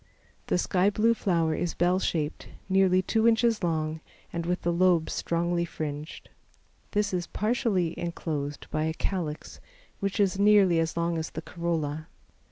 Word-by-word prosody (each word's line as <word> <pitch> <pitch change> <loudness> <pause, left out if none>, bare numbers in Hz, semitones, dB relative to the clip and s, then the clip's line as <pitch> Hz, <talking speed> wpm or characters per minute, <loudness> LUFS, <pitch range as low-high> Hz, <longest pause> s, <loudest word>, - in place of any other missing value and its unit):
The - - +2
sky 185 +2 +2
blue 220 +3 +3
flower 170 -7 +1
is 170 +2 -2
bell 180 +2 +2
shaped, 155 -4 -2 0.2
nearly 190 -1 +3
two 225 +4 +2
inches 230 -2 +3
long 160 -2 -1 0.3
and 170 0 -3
with 180 +1 -1
the 175 - +1
lobes 175 -2 +3
strongly 170 +1 0
fringed. 155 -2 -6 0.6
This 205 -2 0
is 175 -1 -1
partially 210 -6 0
enclosed 150 -4 -4
by 155 0 0
a 160 0 -2
calyx, 165 -6 -4 0.4
which 200 +1 -2
is 195 -1 +2
nearly 200 -4 +5
as 165 0 -1
long 170 0 0
as 160 - -4
the 160 - -7
corolla. 160 -3 -3
175 Hz, 155 wpm, -27 LUFS, 160-195 Hz, 0.6 s, nearly